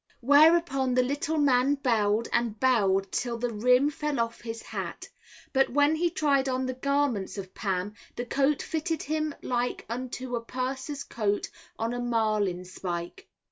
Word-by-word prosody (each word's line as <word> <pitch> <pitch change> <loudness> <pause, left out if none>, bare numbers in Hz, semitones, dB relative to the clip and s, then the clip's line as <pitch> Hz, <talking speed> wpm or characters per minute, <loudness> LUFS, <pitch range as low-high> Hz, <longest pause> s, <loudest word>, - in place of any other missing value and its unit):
Whereupon 285 -1 +4
the 255 - +4
little 290 +4 -1
man 275 -1 +3
bowed 225 -5 +1
and 230 -3 0
bowed 195 -7 +2
till 240 -1 -2
the 240 0 -2
rim 250 +6 +3
fell 300 -2 -2
off 230 0 -2
his 230 -1 -6
hat; - - -6 0.5
but 270 -1 +3
when 290 +4 +3
he 345 +2 +1
tried 280 -5 +1
on 260 0 -1
the 255 - -2
garments 275 -7 0
of 190 -1 -7
Pam, 195 -1 -2 0.2
the 245 - -3
coat 275 +3 +1
fitted 325 0 -2
him 310 0 -2
like 245 0 -1
unto 250 +1 -4
a 235 - -2
purser's 265 +4 -4
coat 205 -3 -1 0.3
on 225 +1 -2
a 245 - -3
marlin 215 -6 0
spike. 180 - -6
250 Hz, 160 wpm, -28 LUFS, 225-285 Hz, 0.5 s, Whereupon